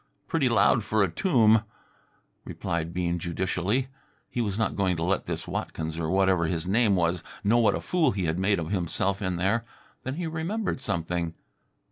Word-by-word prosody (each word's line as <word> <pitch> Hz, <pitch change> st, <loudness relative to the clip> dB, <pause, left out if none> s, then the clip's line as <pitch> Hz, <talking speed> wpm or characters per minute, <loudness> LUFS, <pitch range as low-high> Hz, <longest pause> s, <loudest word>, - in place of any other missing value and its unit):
"Pretty 155 Hz, -7 st, +1 dB
loud 110 Hz, 0 st, +4 dB
for 110 Hz, 0 st, +2 dB
a 95 Hz, -, 0 dB
tomb," 110 Hz, -, +4 dB, 0.8 s
replied 85 Hz, -1 st, -3 dB
Bean 85 Hz, 0 st, -1 dB
judicially. 95 Hz, +8 st, -1 dB, 0.4 s
He 120 Hz, -, -1 dB
was 100 Hz, -3 st, -1 dB
not 110 Hz, -3 st, 0 dB
going 95 Hz, -2 st, +1 dB
to 80 Hz, -, -2 dB
let 95 Hz, +2 st, 0 dB
this -, -, -4 dB
Watkins, 80 Hz, +1 st, -4 dB
or 80 Hz, -1 st, -1 dB
whatever 95 Hz, -3 st, +3 dB
his 80 Hz, 0 st, -1 dB
name 105 Hz, +1 st, +3 dB
was, 85 Hz, -1 st, +1 dB, 0.2 s
know 115 Hz, +4 st, +4 dB
what 105 Hz, -4 st, +4 dB
a -, -, -3 dB
fool 170 Hz, -6 st, +2 dB
he 100 Hz, -5 st, -2 dB
had 80 Hz, +2 st, -1 dB
made 100 Hz, +2 st, +2 dB
of 85 Hz, +1 st, -4 dB
himself 95 Hz, +1 st, 0 dB
in 95 Hz, -2 st, -1 dB
there. 95 Hz, +6 st, +1 dB, 0.4 s
Then 130 Hz, +2 st, -4 dB
he 175 Hz, +2 st, -3 dB
remembered 165 Hz, +7 st, -2 dB
something. 85 Hz, -5 st, -2 dB
95 Hz, 180 wpm, -27 LUFS, 85-115 Hz, 0.8 s, loud